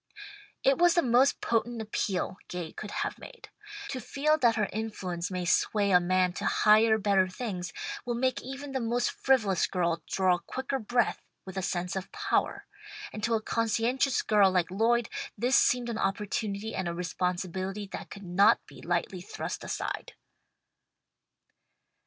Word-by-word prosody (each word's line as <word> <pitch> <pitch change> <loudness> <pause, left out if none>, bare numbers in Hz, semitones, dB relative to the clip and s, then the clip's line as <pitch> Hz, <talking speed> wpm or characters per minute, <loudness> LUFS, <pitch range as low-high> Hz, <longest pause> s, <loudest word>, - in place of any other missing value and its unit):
It 270 +2 +3
was 350 0 +5
the 345 - +4
most 250 +3 +3
potent 235 +1 0
appeal 200 -4 -2
Gay 175 -3 -5
could 215 - -7
have - - -3
made. - - -12 0.4
To 260 - -3
feel 295 +6 +1
that 235 -4 +4
her 210 -2 +1
influence 190 -5 -3
may 180 -2 -3
sway 200 +3 +2
a 180 - +7
man 180 0 +2
to - - -5
higher, 220 +1 +5
better 200 -3 +3
things, 185 -3 -5 0.3
will 240 -1 -2
make 255 +2 0
even 270 +2 -7
the 265 - -1
most 240 +1 0
frivolous 220 -9 +2
girl 170 -3 0
draw 185 -2 +2
quicker 260 +8 -4
breath 240 +1 0 0.2
with 190 -1 -9
a 190 - -1
sense 180 -1 -2
of 190 0 -5
power, 420 -1 -1 0.5
and 215 - -7
to 230 +1 +2
a 220 - 0
conscientious 230 +5 +1
girl 205 -3 +5
like 180 -2 +1
Lloyd 230 +3 +2 0.3
this 245 +5 +2
seemed 245 -1 +3
an 230 -2 -3
opportunity 205 +1 -2
and 185 - -2
a 170 - -3
responsibility 185 +3 -3
that - - -7
could 200 - -10
not 200 +5 +4
be - - -14
lightly 175 +2 -2
thrust 180 - -5
aside. - - -4
210 Hz, 160 wpm, -29 LUFS, 185-240 Hz, 0.5 s, a